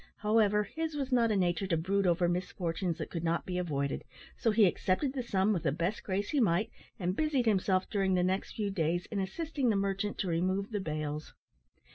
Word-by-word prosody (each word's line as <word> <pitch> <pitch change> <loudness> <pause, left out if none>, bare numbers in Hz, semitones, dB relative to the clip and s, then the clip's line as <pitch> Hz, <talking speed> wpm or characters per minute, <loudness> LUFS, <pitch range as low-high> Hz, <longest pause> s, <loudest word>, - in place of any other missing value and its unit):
However, 210 -1 +3
his 320 +7 -4
was 275 -2 -3
not 235 -2 +4
a 215 - +2
nature 180 0 +1
to 170 -3 +1
brood 195 +4 +1
over 175 0 +3
misfortunes 175 -1 -2
that - - -5
could 170 -2 -3
not 170 0 0
be 180 -1 -2
avoided, 140 -5 -2 0.3
so 230 - +1
he 215 -1 +5
accepted 190 - +1
the 265 - -2
sum 205 -3 +1
with 175 - -1
the 150 - +1
best 170 +8 -1
grace 200 +1 -2
he 295 - +2
might, 200 -2 +2 0.3
and 180 0 -1
busied 290 -4 +1
himself 190 -3 +2
during 195 -2 +1
the 180 - +2
next 190 +2 -1
few 205 -2 -1
days 175 -1 0
in 205 - -1
assisting 275 - -1
the 215 - +2
merchant 195 +1 -1
to 195 - -2
remove 185 +5 0
the 210 - -1
bales. 155 -2 -4
190 Hz, 210 wpm, -31 LUFS, 175-215 Hz, 0.3 s, he